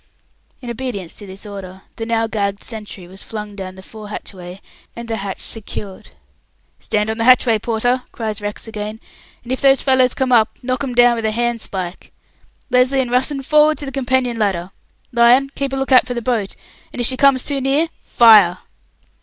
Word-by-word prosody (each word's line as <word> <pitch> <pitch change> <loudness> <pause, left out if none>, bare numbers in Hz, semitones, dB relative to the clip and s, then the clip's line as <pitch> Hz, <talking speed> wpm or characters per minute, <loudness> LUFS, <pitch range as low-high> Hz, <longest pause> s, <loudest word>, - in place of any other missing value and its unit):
In 240 -2 -5
obedience 230 -8 -5
to 205 - -10
this 190 +3 -9
order, 190 -2 -9
the 225 - -4
now 225 -1 +1
gagged 200 -2 -2
sentry 210 -5 -5
was 190 +2 -8
flung 210 -2 -7
down 190 -2 -7
the 190 - -12
fore 215 +1 -11
hatchway, 185 -3 -8 0.4
and 235 0 -7
the 225 -1 -2
hatch 195 -1 -5
secured. 205 -3 -6 0.7
"Stand 210 +1 -1
on 220 - -5
the - - +1
hatchway, 240 -2 +5
Porter," 245 +3 0
cries 215 -2 -4
Rex 205 +2 -5
again; 215 0 -6 0.4
"and 245 - -8
if 260 - -2
those 275 -1 +4
fellows 260 -2 +3
come 260 -1 0
up, 225 -2 +3
knock 255 +1 -1
'em 255 -3 -4
down 245 -1 +5
with 225 - -3
a 220 - +1
handspoke. 220 -6 -3 0.6
Lesly 250 +2 +3
and 250 -2 -1
Russen, 265 +2 0
forward 300 +1 +4
to 290 - -6
the 270 - -5
companion 255 -3 0
ladder! 190 -3 -1 0.4
Lyon, 245 +3 +4
keep 275 -1 -3
a - - -2
look 270 0 -3
out 255 -1 +6
for 245 - -4
the 235 - -2
boat, 220 -6 -1 0.4
and - - -8
if 240 - +1
she 260 - +2
comes 270 -1 +4
too 280 -2 -2
near, 280 +5 +2
fire!" 210 -7 +6
230 Hz, 195 wpm, -19 LUFS, 205-255 Hz, 0.7 s, out